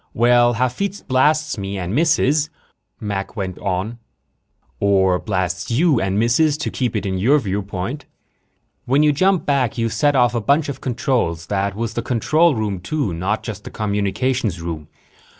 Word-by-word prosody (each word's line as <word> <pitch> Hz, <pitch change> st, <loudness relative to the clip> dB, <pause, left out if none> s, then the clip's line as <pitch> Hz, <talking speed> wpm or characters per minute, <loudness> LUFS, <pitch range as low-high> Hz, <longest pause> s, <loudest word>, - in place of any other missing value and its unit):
"Well, 120 Hz, +1 st, +4 dB
Hafitz 130 Hz, -, -2 dB
blasts 150 Hz, +1 st, +1 dB
me 100 Hz, 0 st, -4 dB
and 90 Hz, +1 st, -3 dB
misses," 150 Hz, 0 st, +2 dB, 0.5 s
Mac 100 Hz, -2 st, -4 dB
went 95 Hz, -4 st, -4 dB
on, 100 Hz, +4 st, -3 dB, 0.4 s
" -, -, -43 dB
or 95 Hz, -2 st, +3 dB
blasts 95 Hz, -2 st, -2 dB
you 140 Hz, +2 st, +3 dB
and 95 Hz, +1 st, 0 dB
misses, 140 Hz, +7 st, +3 dB
to 150 Hz, -, -3 dB
keep 125 Hz, -4 st, -2 dB
it 105 Hz, -1 st, -1 dB
in 95 Hz, -1 st, -2 dB
your 130 Hz, +10 st, +4 dB
viewpoint. 100 Hz, +3 st, -4 dB, 0.8 s
When 140 Hz, +4 st, +3 dB
you 150 Hz, -, +5 dB
jump 185 Hz, +5 st, +2 dB
back, 135 Hz, -5 st, +1 dB
you 115 Hz, -1 st, 0 dB
set 140 Hz, +7 st, +1 dB
off 120 Hz, -2 st, +3 dB
a 120 Hz, -, -1 dB
bunch 145 Hz, +6 st, +2 dB
of 135 Hz, -1 st, -6 dB
controls. 125 Hz, -, -1 dB
That 100 Hz, 0 st, 0 dB
was 115 Hz, 0 st, -3 dB
the 120 Hz, -, -2 dB
control 150 Hz, +7 st, +2 dB
room, 105 Hz, -4 st, -2 dB
too, 100 Hz, -, -2 dB
not 95 Hz, +6 st, -2 dB
just 105 Hz, -3 st, -6 dB
the -, -, -8 dB
communications 105 Hz, 0 st, -1 dB
room. 80 Hz, -3 st, -5 dB
115 Hz, 170 wpm, -20 LUFS, 100-140 Hz, 0.8 s, you